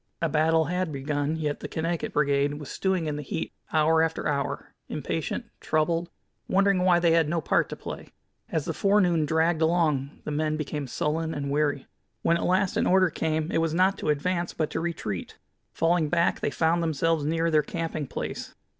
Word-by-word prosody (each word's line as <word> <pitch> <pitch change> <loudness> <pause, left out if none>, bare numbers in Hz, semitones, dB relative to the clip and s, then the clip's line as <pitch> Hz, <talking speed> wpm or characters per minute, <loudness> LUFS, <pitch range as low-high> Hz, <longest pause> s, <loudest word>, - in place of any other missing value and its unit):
A 165 - +1
battle 160 +1 +3
had 180 0 -1
begun, 145 +2 -1
yet 150 -2 -2
the - - -5
Connecticut 165 +1 -2
Brigade 145 0 +2
was 145 -1 -8
stewing 190 -3 0
in 150 -1 -2
the - - -4
heat 150 - -4 0.2
hour 160 +1 +4
after 160 0 0
hour, 140 -2 -2 0.2
impatient, - - -3
troubled, 165 +2 0 0.4
wondering 195 -1 +3
why 180 -1 +5
they 170 -1 +3
had 165 -2 +3
no 170 +1 +1
part - - +1
to - - -5
play. - - -7 0.4
As 155 -3 -1
the 165 - -2
forenoon 180 -3 +3
dragged 160 +1 +2
along 160 -4 +1
the - - -4
men 155 +1 0
became 150 -2 -4
sullen 160 +5 -1
and 140 -1 -3
weary. 145 -1 0 0.4
When 170 - +3
at 170 - -1
last 185 +1 +2
an - - +2
order 185 -1 +4
came 160 0 -1
it - - +1
was 165 -1 0
not 190 +2 +3
to - - -2
advance, 170 +4 0
but 155 - -1
to - - -2
retreat. 160 - -4 0.3
Falling 165 -2 +1
back, 170 +1 +2
they - - 0
found 165 +3 +1
themselves 165 -1 +1
near 165 +2 +1
their 155 -1 +5
camping 160 -1 -4
place. - - -5
160 Hz, 190 wpm, -26 LUFS, 150-170 Hz, 0.4 s, why